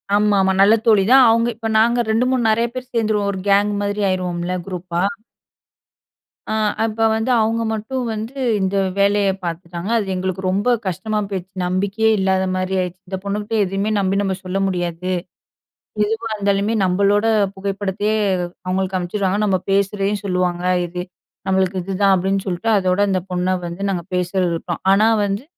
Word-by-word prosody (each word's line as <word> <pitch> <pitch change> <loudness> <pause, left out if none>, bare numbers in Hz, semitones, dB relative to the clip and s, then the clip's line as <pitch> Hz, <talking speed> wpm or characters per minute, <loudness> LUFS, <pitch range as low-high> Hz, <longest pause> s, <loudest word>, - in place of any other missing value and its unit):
ஆமாமா, 200 -2 +3
நல்ல 200 +2 +6
தோழி 215 -4 +5
தான். 265 -1 +8
அவங்க 230 +1 +3
இப்ப 225 0 -4
நாங்க 235 +2 +3
2 225 +3 +2
3 255 -2 +1
நெறைய 230 +2 +2
பேர் 255 0 -7
சேர்ந்துருவோம் 215 -3 +1
1 190 - -5
கேங் 200 +1 +4
மாதிரி 205 +1 -2
ஆயிருவோம்ல 180 -1 -2
குரூப்பா. 180 -2 -3 1.5
அ - - 0 0.3
அப்ப 225 0 -2
வந்து, 220 +3 -1
அவங்க 225 +1 0
மட்டும் 225 +5 -3
வந்து 220 +4 -5 0.3
இந்த 190 +1 0 0.2
வேலைய 200 0 +3 0.2
பார்த்துட்டாங்க. 170 +2 -5
அது 210 -3 -1
எங்களுக்கு 185 0 -3
ரொம்ப 200 +6 0 0.2
கஷ்டமா 215 +4 -2
போயிருச்சு. 190 -2 -5
நம்பிக்கையே 200 +5 +1
இல்லாத 190 0 +1
மாரி 185 +1 -2
ஆயிருச்சு. 180 0 -4
"இந்தப் 190 0 -5
பொண்ணுகிட்ட 205 +2 -3
எதுவுமே 195 +3 -2
நம்பி 195 0 0
நம்ம 195 -2 -1
சொல்ல 185 +1 -2
முடியாது. 175 -1 -3 0.9
எதுவா 225 +2 -2
இருந்தாலுமே, 200 +1 0
நம்பளோட 200 +3 +2 0.3
புகைப்படத்தையே 200 +2 -2 0.5
அவங்களுக்கு 190 0 -1
அனுப்ச்சுருவாங்க. 190 +2 -1
நம்ப 190 -3 +1
பேசுறதையும் 200 +1 0
சொல்லுவாங்க. 180 -2 -1 0.2
இது 180 +1 -5 0.5
நம்மளுக்கு 190 0 +1
இதுதான்." 195 +1 +2
அப்படீன்னு 195 +2 -1
சொல்ட்டு, 185 +5 -2
அதோட 185 -1 +1
இந்த 185 -1 0
பொண்ண 180 +1 0
வந்து 170 +2 -6
நாங்க 175 -3 -2
பேசறத 180 +1 0
விட்டோம். 170 +1 -5
ஆனா 210 +3 +4 0.2
வந்து 200 +3 -2
195 Hz, 150 wpm, -20 LUFS, 185-210 Hz, 1.5 s, தான்